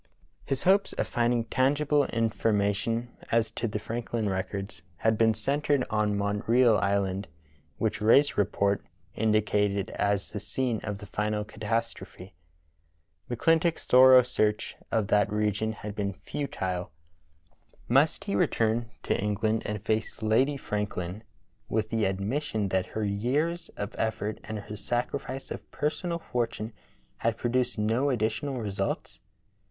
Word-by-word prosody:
His 135 -1 -2
hopes 195 +2 +3
of - - -1
finding 120 0 +1
tangible 145 +4 +2
information 115 0 0 0.2
as 115 -1 +2
to 115 +1 -2
the 105 - -2
Franklin 115 0 -3
records 95 -1 -4 0.2
had 110 +3 +2
been 110 0 +3
centred 140 +4 +1
on 105 -1 +1
Montreal 105 +3 +3
Island, 100 0 0 0.5
which 110 -1 -1
Rae's 135 +7 +5
report 100 0 +1
(p. - - -31 0.3
139) - - 0
indicated 105 -2 +2
as 100 -1 0
the 105 - -4
scene 115 +3 -1
of 105 -1 -4
the 105 - -10
final 105 +1 -1
catastrophe. 105 -3 -4 1.0
McClintock's 165 +7 +2
thorough 130 0 +8
search 110 -3 0 0.2
of 110 -3 +1
that 105 -1 +3
region 105 +1 0
had 105 -1 -7
been 100 -1 -2
futile. 95 -7 -4 1.0
Must 135 +6 +3
he - - -3
return 115 +3 +1
to - - +1
England 105 +2 0
and 105 -1 -4
face 110 0 -1
Lady 130 +7 +3
Franklin 105 -4 -3 0.5
with 110 0 -1
the 115 -1 +1
admission 105 +3 -1
that 95 -1 0
her 110 - 0
years 135 +12 -1
of 100 +1 -4
effort 110 -1 -1
and 110 -1 -4
her 105 - -8
sacrifice 125 +4 -3
of - - -7
personal 170 +4 -2
fortune 115 -7 -3 0.4
had 115 0 0
produced 125 0 0
no 115 +6 +1
additional 120 +3 -1
results.? 100 -3 -3
110 Hz, 135 wpm, -28 LUFS, 105-125 Hz, 1.0 s, thorough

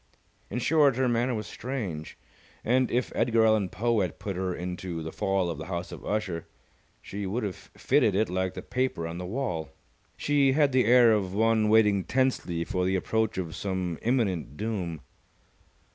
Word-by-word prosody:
In 110 - -4
short 145 0 +4
her 130 0 +1
manner 120 +1 +1
was 110 -1 -4
strange, 100 - -5 0.5
and, 130 +2 +3
if 125 +1 0
Edgar 115 -1 +3
Allen 110 -4 +3
Poe 115 +3 0
had 90 -4 -2
put 100 -2 -5
her 95 0 -1
into 90 -2 -5
"The 80 - -5
Fall 95 -2 0
Of 85 -3 -4
the 80 - -6
House 85 -1 -4
of - - -9
Usher", 100 -6 -2 0.6
she 100 0 -5
would 110 +6 -2
have 100 -4 -6
fitted 105 - +3
it 110 +3 +2
like 95 0 -2
the - - -6
paper 130 -10 -1
on 85 +1 -6
the 90 - -5
wall. 95 -8 -3 0.5
She 140 -2 +3
had 145 -1 +3
the 130 -2 +3
air 120 0 +6
of 100 -3 0
one 110 0 +3
waiting 105 -3 +4
tensely 125 -10 0
for 90 - -1
the 95 +1 +1
approach 110 +3 0
of 85 -4 -3
some 95 -4 -3
imminent 95 - 0
doom. 95 -8 -3
105 Hz, 180 wpm, -27 LUFS, 90-120 Hz, 0.6 s, air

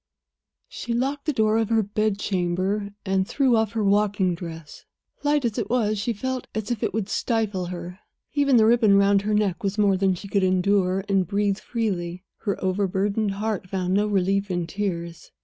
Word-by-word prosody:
She 235 -1 -4
locked 275 +4 -1
the - - +3
door 220 -4 +2
of 225 - 0
her 225 -1 +3
bedchamber, 200 -1 -1 0.2
and 190 0 +1
threw 255 0 +2
off 220 -1 +1
her 220 -2 0
walking 200 -2 +2
dress; 165 -3 -9 0.4
light 290 -2 +1
as 230 0 -1
it 225 - -3
was, 215 -4 +1
she 210 +4 -1
felt 255 +3 -3
as 220 +1 -3
if 235 - -2
it - - 0
would 215 -3 -2
stifle 210 -6 -1
her. 180 +1 -7 0.3
Even 280 -3 +3
the 220 - +6
ribbon 220 -3 +5
round 200 0 +4
her 210 +1 0
neck 200 -5 0
was 200 +1 -1
more 200 -2 +3
than 190 -1 +2
she 200 - -9
could 200 0 +1
endure 185 0 +2
and 195 -3 +1
breathe 200 +1 0
freely. 185 -6 -3 0.2
Her 200 -3 -2
overburdened 200 +2 0
heart 200 -2 -3
found 185 -1 -1
no 205 +2 +2
relief 195 0 +1
in 175 -2 -1
tears. 170 -2 -4
200 Hz, 185 wpm, -24 LUFS, 185-220 Hz, 0.4 s, the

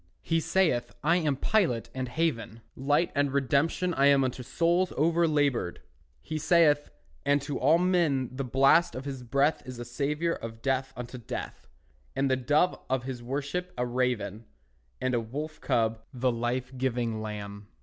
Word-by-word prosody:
He 165 -1 +1
saith, 160 -8 +1
"I 170 +4 +4
am 155 -5 +1
pilot 130 - +1
and 130 -1 -3
haven, 115 -7 -2
Light 145 +6 +1
and 145 -1 +1
redemption 140 +6 +1
I 140 -3 +4
am 140 -1 +5
Unto 130 0 -2
souls 175 +7 +1
overlaboured," 150 - +1 0.5
he 155 0 -4
saith; 155 -2 +4 0.3
And 145 0 +3
to 145 -2 -3
all 150 +6 +5
men 170 -8 +1
the 135 - -2
blast 135 +4 +4
of 130 +2 -6
his 135 -2 -5
breath 140 +5 +1
Is 130 -1 -8
a 120 - -6
savour 150 +7 -1
of 115 0 -8
death 135 0 0
unto 125 +1 -7
death; 115 - -7 0.5
And 135 0 +1
the - - +4
Dove 145 +7 +2
of 130 -1 0
his 130 -2 -5
worship 145 +8 -3
a 125 - 0
raven, 120 -4 -1 0.5
And 130 0 -1
a 120 - +2
wolf 150 +7 -6
cub 110 -1 +1
the 130 -1 0
life 125 +2 -2
giving 120 -4 -1
Lamb. 100 -1 -6
135 Hz, 165 wpm, -28 LUFS, 120-155 Hz, 0.5 s, am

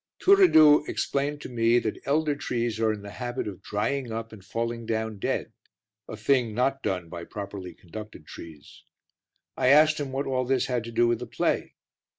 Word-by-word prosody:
Turiddu 160 - +6
explained 145 +1 -2
to - - -7
me 115 -1 +3
that 110 -3 -2
elder 150 +1 +1
trees 120 -5 -2
are 110 -1 +2
in 105 -2 -6
the 100 - -8
habit 120 +1 -4
of 95 -4 -7
drying 115 +4 -2
up 115 0 -5
and 100 -4 -12
falling 115 +2 -4
down 110 -2 -2
dead, - - -2 0.5
a 110 - -7
thing 115 0 +1
not 135 +3 +1
done 90 -3 -2
by 85 0 -7
properly 95 -3 -7
conducted 105 -2 -10
trees. 80 -1 -12 0.7
I - - 0
asked 150 +3 +6
him 140 -2 -4
what 135 +2 -2
all 130 -1 0
this 130 0 +1
had 125 -3 -1
to 115 - -7
do 120 +1 +3
with 120 -1 +1
the 125 - -6
play. - - -1
115 Hz, 185 wpm, -26 LUFS, 105-135 Hz, 0.7 s, Turiddu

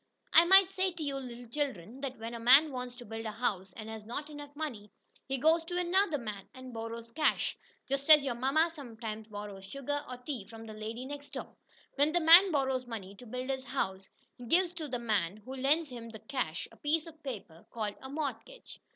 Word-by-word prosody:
I 335 - +9
might 385 +1 +7
say 380 0 +1
to 335 -2 -5
you 280 -2 -2
little 245 -2 -7
children 250 - -3
that 265 -2 -4
when 225 +1 -6
a 235 - -5
man 270 +6 +7
wants 250 -1 -5
to 245 -1 -10
build 225 +1 -5
a - - -2
house 195 -6 -1
and 215 - -8
has 220 -1 -7
not 290 +7 -5
enough 290 -1 -8
money, 245 -10 -5 0.4
he 270 0 -1
goes 320 +5 +4
to 355 +1 -3
another 360 -2 +2
man 210 -6 -6
and 255 -1 -9
borrows 230 0 -6
cash, 305 +4 +1 0.3
just 275 +2 -2
as 300 -2 +9
your 265 - 0
mamma 275 +7 +2
sometimes 225 -6 -7
borrows 205 -2 -7
sugar, 275 +7 -3
or 250 - -5
tea, 250 -5 -5
from 225 +1 -10
the 220 - -8
lady 220 +4 -5
next 285 +1 -8
door. - - -6 0.4
When 290 +2 +4
the 350 - +4
man 345 +4 +9
borrows 265 -4 0
money 200 -5 -6
to 245 - -12
build 255 +3 -3
his 265 -1 -3
house, 195 -7 -2 0.3
he 245 - -8
gives 355 +5 +3
to 325 -3 -5
the 250 -3 -2
man 210 -6 0
who 260 - -6
lends 285 +4 +2
him 235 -2 -8
the 220 - -8
cash, 240 - -3
a - - -17
piece 310 +2 0
of 320 -1 -13
paper, 200 - -7
called 215 -3 -3
a 265 - -8
mortgage. 310 - -5
255 Hz, 220 wpm, -32 LUFS, 225-295 Hz, 0.4 s, I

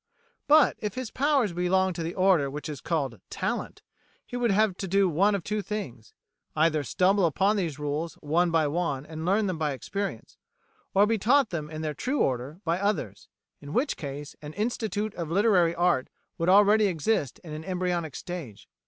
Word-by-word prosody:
But 300 -1 +5
if 210 -2 -4
his 255 -3 -5
powers 270 - +1
belonged 185 +2 +1
to - - -3
the 165 +1 -4
order 185 -7 +3
which 145 +2 -6
is 150 -4 -6
called 140 -9 -2
talent, - - -3 0.4
he - - -8
would 245 -1 +1
have 205 -1 +3
to 195 - -4
do 195 +1 +3
one 195 +5 +3
of 195 - -3
two 210 +3 -2
things: 145 - -6 0.4
either 155 -1 +2
stumble 185 +6 +2
upon 195 +7 +2
these 170 -8 -2
rules 150 +3 -3
one 170 +4 +1
by 165 -2 +2
one 145 -3 -1
and 160 +1 -6
learn 205 +3 +3
them 185 -4 -2
by 150 -2 0
experience 195 - -5 0.6
or 200 +2 +6
be 220 0 0
taught 255 +4 +3
them 155 -3 -4
in 155 0 -6
their 155 -1 -2
true 255 - -2
order 130 +7 -1
by 170 +2 0
others, 200 - -2 0.3
in 145 +1 -8
which 275 +4 +1
case 145 0 -7
an 150 0 -8
Institute 215 -1 -2
of 170 -3 -5
Literary 180 -3 +3
Art 175 -7 +2 0.3
would 165 +2 +1
already 205 +2 +6
exist 165 - 0
in 155 -3 -8
an 155 +1 -6
embryonic 180 -4 -2
stage. 150 - -7
175 Hz, 190 wpm, -27 LUFS, 155-205 Hz, 0.6 s, or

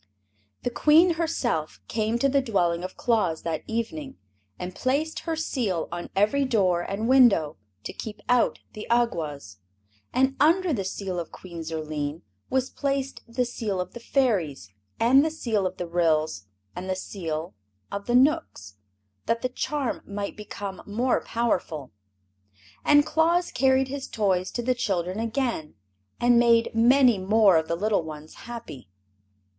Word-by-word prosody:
The 245 - -1
Queen 315 +7 +5
herself 260 - -1
came 220 +1 0
to 275 - +2
the 275 0 +2
dwelling 175 -8 0
of 185 - -7
Claus 215 -9 +1
that 165 -2 -2
evening 265 +5 -4 0.4
and 180 0 -6
placed 285 +8 -1
her 325 - +1
Seal 235 - -1
on 175 0 -5
every 215 +9 +3
door 195 -9 +2
and 200 +5 -3
window, 240 - +5 0.3
to - - -6
keep 215 -2 -7
out 245 -1 +3 0.2
the 215 - -8
Awgwas. 155 - -1 0.5
And 265 +1 +2
under 335 +4 +4
the 200 -7 -1
Seal 190 -1 -3
of 170 - -6
Queen 170 -3 -9
Zurline 155 -1 -4 0.3
was 260 0 0
placed 275 -1 -2
the 245 +2 -1
Seal 215 -5 -3
of 180 - -4
the 240 - -8
Fairies 185 - 0 0.3
and 260 +5 +6
the 320 - +1
Seal 225 -11 -1
of 185 - -7
the 175 - -3
Ryls 155 - 0 0.3
and 185 +1 -6
the 185 - 0
Seals 165 - -5 0.4
of 200 0 -5
the 240 - +2
Knooks, 255 - +1 0.5
that 230 +1 0
the 255 - +1
charm 280 0 -2
might 200 0 -4
become 205 -2 -7
more 240 +5 0
powerful. 175 - -2 0.9
And 290 0 +5
Claus 330 +3 +2
carried 265 0 +2
his 275 0 -5
toys 190 -4 0
to 240 - -2
the 255 +2 +2
children 190 -5 -2
again, 230 - -2 0.4
and 240 0 +5
made 235 -1 +4
many 240 -1 +5
more 200 -1 +5
of 160 0 0
the 170 - 0
little 205 +2 +1
ones 155 -1 -9 0.2
happy. 225 - -8
220 Hz, 155 wpm, -26 LUFS, 175-260 Hz, 0.9 s, and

